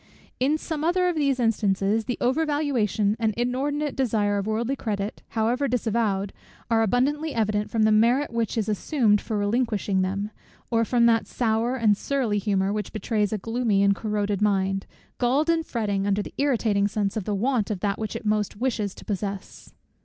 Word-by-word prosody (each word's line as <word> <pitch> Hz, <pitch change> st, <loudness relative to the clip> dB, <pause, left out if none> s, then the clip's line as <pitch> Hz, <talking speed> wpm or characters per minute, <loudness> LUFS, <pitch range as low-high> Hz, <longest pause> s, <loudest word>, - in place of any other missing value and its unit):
In 280 Hz, +5 st, +2 dB
some 310 Hz, -1 st, -4 dB
other 360 Hz, +2 st, +2 dB
of 350 Hz, -, -2 dB
these 280 Hz, -4 st, +1 dB
instances, 210 Hz, -2 st, +1 dB
the 245 Hz, -, -2 dB
over 260 Hz, +6 st, +1 dB
valuation 245 Hz, -9 st, 0 dB
and 220 Hz, -2 st, 0 dB
inordinate 275 Hz, +4 st, -1 dB
desire 210 Hz, -6 st, +1 dB
of 200 Hz, -, -4 dB
worldly 230 Hz, +5 st, -1 dB
credit, 205 Hz, -4 st, -4 dB, 0.2 s
however 240 Hz, +6 st, +1 dB
disavowed, 220 Hz, -5 st, 0 dB, 0.4 s
are 225 Hz, -1 st, +4 dB
abundantly 280 Hz, +7 st, +1 dB
evident, 210 Hz, -2 st, 0 dB
from 225 Hz, -1 st, +1 dB
the 215 Hz, -, +4 dB
merit 235 Hz, +6 st, +3 dB
which 230 Hz, -1 st, -1 dB
is 215 Hz, -, 0 dB
assumed 215 Hz, 0 st, +2 dB
for 220 Hz, -, -3 dB
relinquishing 205 Hz, -2 st, 0 dB
them; 200 Hz, +3 st, -2 dB, 0.4 s
or 230 Hz, -1 st, +3 dB
from 235 Hz, 0 st, +3 dB
that 230 Hz, -1 st, +3 dB
sour 230 Hz, +1 st, 0 dB
and 220 Hz, -5 st, +3 dB
surly 235 Hz, -3 st, -1 dB
humour, 195 Hz, -1 st, 0 dB
which 210 Hz, -2 st, -3 dB
betrays 215 Hz, -2 st, -1 dB
a 215 Hz, -, 0 dB
gloomy 225 Hz, -1 st, 0 dB
and 200 Hz, 0 st, +4 dB
a -, -, -14 dB
corroded 210 Hz, -2 st, -1 dB
mind, 195 Hz, -2 st, +1 dB, 0.3 s
galled 275 Hz, +7 st, +2 dB
and 325 Hz, -1 st, -1 dB
fretting 205 Hz, -4 st, -1 dB
under 205 Hz, +1 st, +1 dB
the -, -, -10 dB
irritating 225 Hz, -8 st, +2 dB
sense 205 Hz, -1 st, -2 dB
of 215 Hz, -4 st, -3 dB
the 210 Hz, -, -1 dB
want 230 Hz, +1 st, 0 dB
of 200 Hz, -4 st, -3 dB
that 200 Hz, -1 st, -1 dB
which 215 Hz, -2 st, -4 dB
it -, -, -6 dB
most 210 Hz, -1 st, 0 dB
wishes 220 Hz, -5 st, -1 dB
to -, -, -13 dB
possess. 200 Hz, -1 st, -5 dB
220 Hz, 185 wpm, -25 LUFS, 205-250 Hz, 0.4 s, are